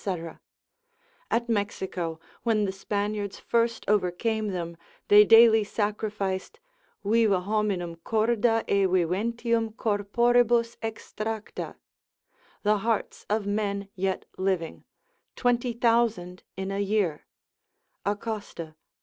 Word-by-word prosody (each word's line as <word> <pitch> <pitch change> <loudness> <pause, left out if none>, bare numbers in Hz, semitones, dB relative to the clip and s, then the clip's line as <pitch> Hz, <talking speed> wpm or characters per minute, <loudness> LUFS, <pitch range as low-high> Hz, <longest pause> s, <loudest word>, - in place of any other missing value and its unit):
At 235 +1 0
Mexico, 190 -6 -2 0.2
when 220 -3 +2
the 190 - -1
Spaniards 205 +1 -3
first 230 0 0
overcame 210 +2 +1
them, 170 -3 -4 0.3
they 210 +1 +9
daily 225 0 +7
sacrificed 205 - -3 0.4
viva 210 -2 +3
hominum 195 -4 -1
corda 225 +4 +1
e 200 -1 +3
viventium 220 +6 0
corporibus 235 +3 +2
extracta, 220 -1 -5 0.9
the 210 0 +3
hearts 225 +1 -2
of 210 0 0
men 200 -1 -2
yet 190 0 -2
living, 185 -4 -1 0.5
20,000 235 -6 +1 0.2
in 190 0 -3
a 195 - -2
year 200 -6 0 0.8
(Acosta 205 -2 -3
lib. 155 -1 -15
210 Hz, 95 wpm, -27 LUFS, 195-225 Hz, 0.9 s, they